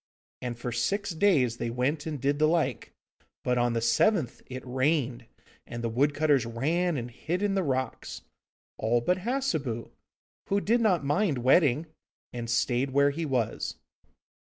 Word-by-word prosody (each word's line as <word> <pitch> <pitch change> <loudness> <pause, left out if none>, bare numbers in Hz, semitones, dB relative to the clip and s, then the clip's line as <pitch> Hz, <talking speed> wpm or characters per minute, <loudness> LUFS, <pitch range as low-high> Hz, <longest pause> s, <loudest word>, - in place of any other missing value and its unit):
And 120 -2 -4
for 120 +1 -4
six 200 - -1
days 155 - +2
they 120 - -2
went 140 +6 -1
and 150 -3 -4
did 140 +3 0
the 155 - +4
like, 155 -7 0 0.5
but 125 -1 +1
on 120 0 +2
the 115 - 0
seventh 120 - +2
it 130 0 -7
rained, 130 -2 0 0.4
and 120 0 -6
the 115 - 0
wood 145 +4 +2
cutters 145 -4 +3
ran 155 +9 0
and 120 -1 -5
hid 175 - -3
in 205 -1 +1
the 195 - +1
rocks, 130 -5 -3 0.6
all 115 +2 +2
but 180 +9 +1
Hassebu, 185 - -2 0.6
who 200 - +2
did 230 +4 +2
not 185 -9 +2
mind 150 +1 +1
wetting, 145 +2 +4 0.5
and 120 -1 -5
stayed 120 +3 +1
where 140 +2 +3
he 160 +2 -3
was. 125 -5 -1
140 Hz, 160 wpm, -28 LUFS, 120-165 Hz, 0.6 s, the